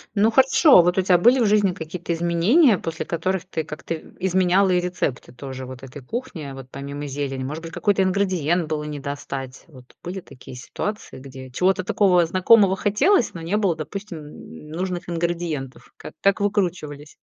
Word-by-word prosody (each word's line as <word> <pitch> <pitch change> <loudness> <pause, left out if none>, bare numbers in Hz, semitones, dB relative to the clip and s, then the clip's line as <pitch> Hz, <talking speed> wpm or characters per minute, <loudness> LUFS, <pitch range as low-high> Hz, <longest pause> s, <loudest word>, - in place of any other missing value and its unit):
Ну 215 +2 +3
хорошо, 265 - +6
вот 175 +2 +1
у - - +4
тя 180 -1 +4
были 245 +7 +5
в 235 - +3
жизни 205 -3 +3
какие-то 170 +1 -6
изменения, 175 - +3
после 165 0 -5
которых 185 +2 -2
ты 165 -4 -3
как-то 155 +2 -6
в 160 - -10
изменяла 185 +1 +2
и 180 - +3
рецепты 175 -8 -3
тоже 130 0 -8
вот 130 0 -10
этой 135 +2 -10
кухни, 235 - -6
а 135 -1 -7
вот 135 -1 -10
помимо 140 +1 -6
зелени? 135 -1 -4
Может 150 +5 -5
быть, 165 - -7
какой-то 200 +1 +1
ингредиент 180 -4 +1
было 155 -1 -2
не 150 -1 -5
достать? 135 -2 -6
Вот 130 -5 -17
были 185 +2 -5
такие 130 -6 -13
ситуации, 205 - -6
где 130 -1 -11
чего-то 185 +7 +1
такого 180 -2 +3
знакомого 190 +3 +4
хотелось, 210 - +2
но 165 - -6
не 170 +6 -1
было, 195 -6 +1
допустим, 155 - -9
нужных 180 +2 -4
ингредиентов. 170 -5 -4
Как - - -10
как 200 -1 +3
выкручивались? 175 -8 -2
170 Hz, 175 wpm, -22 LUFS, 145-190 Hz, -, хорошо